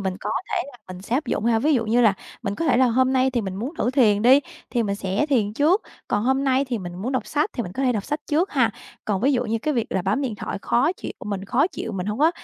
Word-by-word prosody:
mình 190 -1 -2
có - - -3 0.2
thể - - 0
là 270 -3 -13
mình 185 0 -8
sẽ 225 - -2
áp 305 - -2
dụng 210 - -1
ha. 230 -1 +3
Ví 295 +5 +2
dụ 230 - +1
như 235 +3 +3
là 220 -4 +5 0.3
mình 200 -3 -2
có 330 - -3
thể 275 - +3
là 255 0 +5
hôm 255 +2 +2
nay 260 0 +3
thì 245 -2 0
mình 190 -3 -4
muốn 245 - -4
thử 245 - +1
thiền 220 -6 +3
đi, 260 +4 +7 0.3
thì 240 - +1
mình 200 -2 -1
sẽ 200 +7 -1
thiền 230 -8 +1
trước, 315 - +3 0.3
còn 205 +2 0
hôm 265 +2 +2
nay 265 0 +2
thì 250 -4 -3
mình 175 -3 -7
muốn 220 +9 -4
đọc 260 - -1
sách 295 +1 0
thì 240 - -2
mình 180 - -7
có 265 - -3
thể 255 -2 +3
đọc 210 -3 -2
sách 295 +1 -3
trước 330 +6 +1
ha. 245 -5 +3 0.3
Còn 200 -3 -1
ví 275 +5 +3
dụ 245 -2 +1
như 225 0 -1
cái 300 +6 -1
việc 235 - 0
là 190 - 0
bấm 200 +9 0
điện 250 -5 -2
thoại 205 - -5
khó 265 +8 +2
chịu - - -7
mình 200 -2 -3
khó 255 +9 +2
chịu, 225 -10 -6
mình 185 -2 -3
hông 210 +2 -2
có 310 +3 +5
240 Hz, 310 wpm, -23 LUFS, 205-270 Hz, 0.3 s, đi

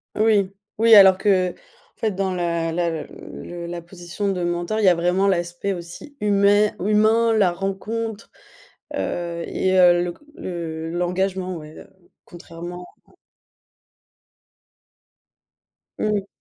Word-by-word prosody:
Oui. 210 -3 +2 0.3
Oui, 225 -1 +7
alors 190 -2 +8
qu'en 185 -4 +2 0.4
fait 220 - -1
dans 190 -1 -2
la 170 -2 -1
la 165 -2 -1
le 175 0 -9
la 170 0 -6
position 175 +3 -4
de 180 -2 -2
mentor, 175 +5 -1
il 210 - +2
y - - +5
a 175 - +4
vraiment 180 +3 +1
l'aspect 175 +1 -1
aussi 175 - -9
humè 205 0 +3
humain, 215 +3 +3
la 200 -5 +3
rencontre 205 +4 -4 0.6
heu, 170 -1 -3
et 190 0 0
heu, 175 -1 +6
le 175 - -3
c - - -22 0.2
le 165 -2 -5
l'engagement, 185 +1 -1
ouais, 155 0 -11
heu, - - -13 0.4
contrairement 175 +1 -9 0.2
à - - -24 2.9
Mmh. 205 -2 -1
185 Hz, 130 wpm, -22 LUFS, 175-200 Hz, 2.9 s, alors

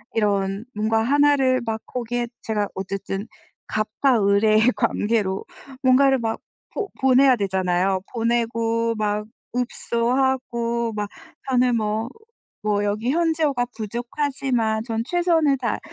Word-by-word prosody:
이런 200 0 0
뭔가 220 +1 +1
1를 275 -1 +3
막 220 -1 -3
거기에 240 -1 -3
제가 210 -2 -1
어쨌든 195 +2 -4 0.4
갑과 215 +4 +1
을의 215 +2 +4
관계로 210 -4 0 0.4
뭔가를 265 +1 +5
막 225 -1 -2 0.4
보 410 -3 -2
보내야 265 0 +5
되잖아요. 190 -2 0
보내고 230 -1 0
막 210 0 -1 0.3
읍소하고 235 -1 0
막 210 -1 -3 0.4
저는 250 -2 +3
뭐 215 +2 -1 0.6
뭐 205 -1 +1
여기 215 +5 0
현지어가 315 -6 +1
부족하지만 235 0 -1
전 225 -2 -2
최선을 330 -4 +2
다 235 -4 -2
230 Hz, 235 characters per minute, -23 LUFS, 210-255 Hz, 0.6 s, 뭔가를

